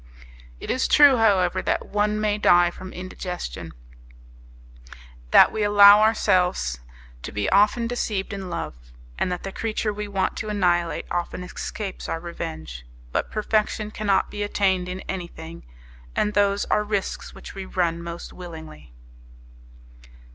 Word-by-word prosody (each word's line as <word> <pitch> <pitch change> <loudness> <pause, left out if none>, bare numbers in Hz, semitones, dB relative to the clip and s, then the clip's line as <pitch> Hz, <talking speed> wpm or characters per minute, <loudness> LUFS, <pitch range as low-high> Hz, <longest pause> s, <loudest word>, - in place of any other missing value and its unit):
It - - -4
is 260 - +1
true, 285 -3 +7
however, 195 -6 +3
that - - -1
one 210 +1 0
may 210 -1 0
die 175 -3 +5
from 185 +1 -10
indigestion, 180 - -6 1.6
that - - +7
we 220 - -3
allow 205 0 +8
ourselves 180 - +2 0.4
to - - -7
be 105 -1 -2
often 210 +4 +4
deceived 215 -5 -2
in 195 -2 -6
love, - - -4 0.5
and 180 - 0
that 180 - -4
the 195 - -5
creature 215 0 -2
we 210 0 -5
want 195 -2 -1
to 215 - -4
annihilate 175 -4 0
often 175 +1 -3
escapes 190 +2 -6
our 165 - -2
revenge; 80 - -7 0.3
but - - -1
perfection 215 0 -1
cannot 205 -3 0
be 205 - -5
attained 190 -3 0
in 185 +1 -5
anything, 170 - -8 0.5
and 210 - 0
those 200 -1 +2
are 210 - +1
risks 205 -2 -3
which - - -10
we 195 -1 -7
run 170 -3 -1
most 170 0 -7
willingly. 160 - -11
190 Hz, 140 wpm, -24 LUFS, 175-210 Hz, 1.6 s, allow